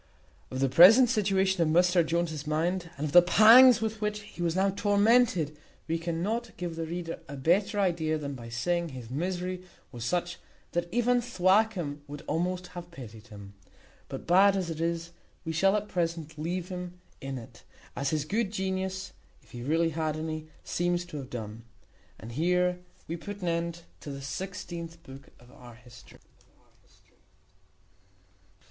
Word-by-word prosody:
Of 130 0 -4
the 135 - +3
present 220 - +8
situation 195 -4 +1
of 165 - +3
Mr 175 +2 +4
Jones's 160 -2 -2
mind, 170 +3 -1
and 145 - -2
of 150 - -3
the 175 - +9
pangs 225 +7 +8
with 220 -1 -3
which 210 0 -2
he 210 -4 -11
was 170 -1 0
now 195 +1 +2
tormented, 205 - +3 0.3
we 165 +1 -1
cannot 175 +8 -3
give 175 -2 -4
the 165 0 -4
reader 170 0 -5
a 140 - -7
better 185 +9 +1
idea 165 -5 +1
than 140 -2 -5
by 120 -3 -9
saying, 170 +9 -1
his 125 -4 -9
misery 180 +4 -3 0.3
was 120 -2 -7
such 175 +6 -2 0.3
that 175 0 -2
even 245 +1 +2
Thwackum 185 -8 +1
would 145 0 -8
almost 180 +2 -1
have 175 -1 -8
pitied 115 -8 -11
him. 100 -3 -11 0.6
But, - - -7
bad 195 +3 +5
as 180 -3 -2
it 160 0 -5
is, 170 0 -2 0.3
we 160 - -2
shall 195 +5 +3
at 210 0 -2
present 165 -4 -3
leave 170 +4 -3
him 180 -1 -7 0.2
in 135 0 -5
it, 115 - -12 0.3
as 140 0 -1
his 150 -1 -1
good 205 +4 -1
genius 190 -1 -3 0.3
(if - - -23
he 120 - -8
really 165 +5 +1
had 155 -1 -2
any) 155 0 -5 0.2
seems 175 0 -1
to 175 -4 -8
have 135 -3 -7
done. 110 -3 -6 0.6
And 115 - -9
here 180 +5 +1 0.3
we 170 - -4
put 205 +2 -8
an 175 - 0
end 170 0 -2 0.2
to - - -9
the 140 -1 -7
sixteenth 170 +1 -6
book 135 0 -12
of 120 +1 -18
our 120 -2 -14
history. 125 +1 -16
170 Hz, 165 wpm, -28 LUFS, 150-190 Hz, 0.6 s, the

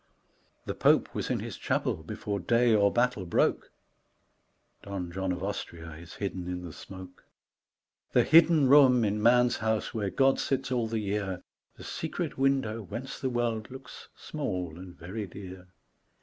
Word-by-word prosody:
The - - -3
Pope - - +3
was - - -3
in - - -1
his - - -6
chapel - - -1
before 100 +5 -4
day 115 +5 +3
or 100 -2 +4
battle 120 -4 +1
broke, 85 - +1 1.1
(Don 95 -3 -5
John 95 +1 -2
of 90 +1 -4
Austria 85 -4 -5
is 85 +2 -11
hidden 95 -3 -4
in 90 0 -4
the 85 -3 -8
smoke.) 95 -1 -11 0.9
The - - +4
hidden 160 -2 +6
room 130 -4 +6
in 105 +1 -1
man's 120 +2 +4
house 110 +1 -1
where 105 -4 -1
God 135 +8 +3
sits 135 -1 -1
all 120 -3 +1
the 115 0 -2
year, 100 -3 -2 0.3
The - - -11
secret - - -4
window 135 -5 +1
whence 115 +8 -7
the 130 - -1
world 120 -3 -1
looks 130 0 -11
small 90 - -4
and 90 -1 -11
very 100 +5 -6
dear. 95 0 -10
105 Hz, 160 wpm, -29 LUFS, 95-125 Hz, 1.1 s, hidden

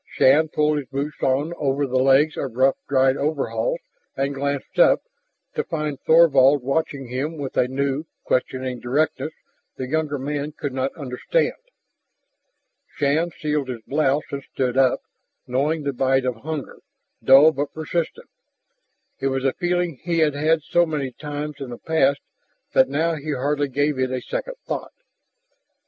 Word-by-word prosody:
Shann 150 +4 +5
pulled 150 -1 +1
his 135 - -8
boots 140 +3 -4
on 140 +6 +1
over 140 0 +1
the 130 -1 0
legs 135 +3 +4
of 130 -4 -4
rough 135 +2 +4
dried 135 0 +3
coveralls 155 - -1 0.4
and 140 +1 0
glanced 140 - -3
up, - - +5 0.5
to - - -1
find 150 -4 -3
Thorvald 145 -4 +5
watching 140 0 -1
him 140 +6 -3
with 140 -3 -5
a 125 - +3
new, 140 +3 -1 0.2
questioning 130 0 -1
directness 150 +5 0 0.5
the 130 - -4
younger 155 0 -1
man 145 +2 -3
could 145 -3 -5
not 130 +1 -1
understand. 140 - -1 1.4
Shann 150 +4 +1
sealed 150 -4 -2
his 120 -3 -5
blouse 145 +1 +1
and 140 - -3
stood 125 -2 -1
up, 130 -1 +3 0.4
knowing 145 +5 0
the 140 -1 -1
bite 130 0 +2
of 125 -2 -1
hunger, 150 +2 -6 0.4
dull 140 +4 +8
but 145 -1 -3
persistent. 170 - -3 0.9
It 135 - 0
was 135 0 -1
a 135 - +2
feeling 175 -4 -1
he 170 -1 -1
had 155 -3 +3
had 155 +2 +1
so 175 +2 +2
many 145 -4 -2
times 150 +1 -6
in 135 -2 -6
the 120 - -7
past 140 -3 +1 0.5
that 130 0 +5
now 160 +4 +1
he 150 +1 -3
hardly 145 +2 0
gave 145 +1 0
it 130 0 +1
a 130 0 -2
second - - -4
thought. - - -4
140 Hz, 160 wpm, -23 LUFS, 135-155 Hz, 1.4 s, dull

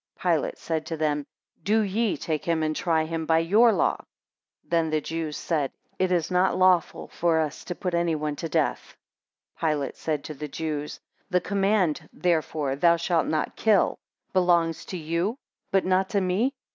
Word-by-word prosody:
3 - - +1
Pilate - - 0
said 160 -2 -2
to 165 - -3
them, 150 -2 -1 0.3
Do 220 +3 +2
ye 210 +1 0
take 155 -2 -3
him 165 -2 0
and 155 0 0
try 160 -2 +1
him 160 0 -4
by 160 - +4
your 210 +9 +5
law. - - +1
4 - - -17 0.6
Then 165 -1 +1
the 155 0 +1
Jews 160 0 -4
said, 150 -5 -1 0.3
It 185 -1 +1
is 175 -1 +1
not 180 +1 +2
lawful 185 -2 +2
for 170 -1 +1
us 155 -2 -2
to 175 - -4
put 180 -1 -3
any 170 -1 +1
one 150 -1 -2
to 165 - -4
death. - - -1 0.6
5 160 - +1
Pilate 145 -3 -2
said 150 -3 -2
to 155 - -6
the 150 +1 -6
Jews, 150 0 -4 0.3
The 180 -2 +3
command, 195 -4 0
therefore, 155 -5 0
thou 170 +4 +4
shalt 170 -1 0
not 155 -1 -1
kill, 215 -3 +2 0.3
belongs 175 -3 +2
to 185 - -5
you, 170 - -1 0.3
but 195 -1 +2
not 185 +1 +2
to 205 -3 +1
me. 200 +10 0
165 Hz, 185 wpm, -26 LUFS, 155-185 Hz, 0.6 s, your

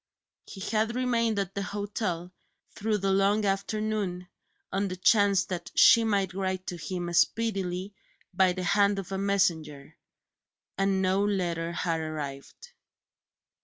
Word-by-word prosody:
He 195 - -10
had 220 +3 0
remained 235 -3 +1
at 195 -1 -2
the 200 - -3
hotel, 200 -3 -3 0.4
through 215 0 -1
the 195 -1 0
long 200 +2 +2
afternoon, 200 -2 -2 0.4
on 200 +1 0
the 185 - -4
chance 200 0 +3
that 180 -2 -5
she 230 - +7
might 200 -4 0
write 185 -1 -2
to 175 - -5
him 175 +2 -4
speedily 195 -1 0 0.4
by 185 0 +3
the 185 0 -4
hand 200 +2 +3
of 195 -1 -6
a 190 - -2
messenger 165 -8 -1 0.8
and 195 0 +1
no 190 +2 +2
letter 175 -5 -1
had 170 -1 -1
arrived. 155 - -7
195 Hz, 135 wpm, -28 LUFS, 180-205 Hz, 0.8 s, she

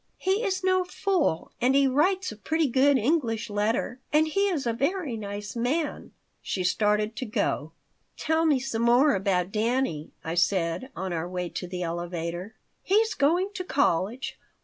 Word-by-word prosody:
"He 385 +5 0
is 380 -3 -1
no 370 0 +3
fool 360 - -1
and 255 +2 +3
he 280 0 +5
writes 350 +8 +2
a - - -8
pretty 320 +9 0
good 270 +2 +4
English 235 -4 0
letter. 220 +4 -1
And 310 +1 +4
he 395 +6 +1
is 325 -9 -1
a 235 - +1
very 285 +1 -1
nice 205 0 -6
man." 275 +7 -2 0.3
She 185 - -2
started 210 +3 +1
to 260 - -3
go 160 -7 -1 0.5
"Tell 320 +1 +1
me 290 -4 +3
some 250 -3 -3
more 245 +5 +5
about 190 -2 0
Dannie," 220 - 0
I 160 - -3
said, 175 +4 +1
on 190 0 -3
our 170 +1 -3
way 180 -1 -3
to 180 - -5
the 180 0 -4
elevator 175 +3 -4 0.3
"He's 440 +3 +2
going 350 +8 +2
to 365 - -4
college. 245 - 0
240 Hz, 170 wpm, -27 LUFS, 190-315 Hz, 0.5 s, he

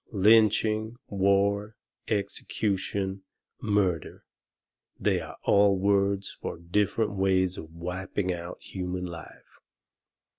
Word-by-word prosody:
Lynching, 110 +1 +4
war, 100 +2 +2 0.3
execution, 100 -2 -2 0.4
murder 100 -6 0 0.8
they - - +2
are - - -9
all 100 -1 +4
words 100 0 +1
for - - -6
different 105 +6 0
ways 95 -2 +2
of 80 -3 -9
wiping 90 +3 -3
out 85 0 -7
human 90 -1 -4
life. 85 -2 -11
100 Hz, 90 wpm, -28 LUFS, 90-105 Hz, 0.8 s, Lynching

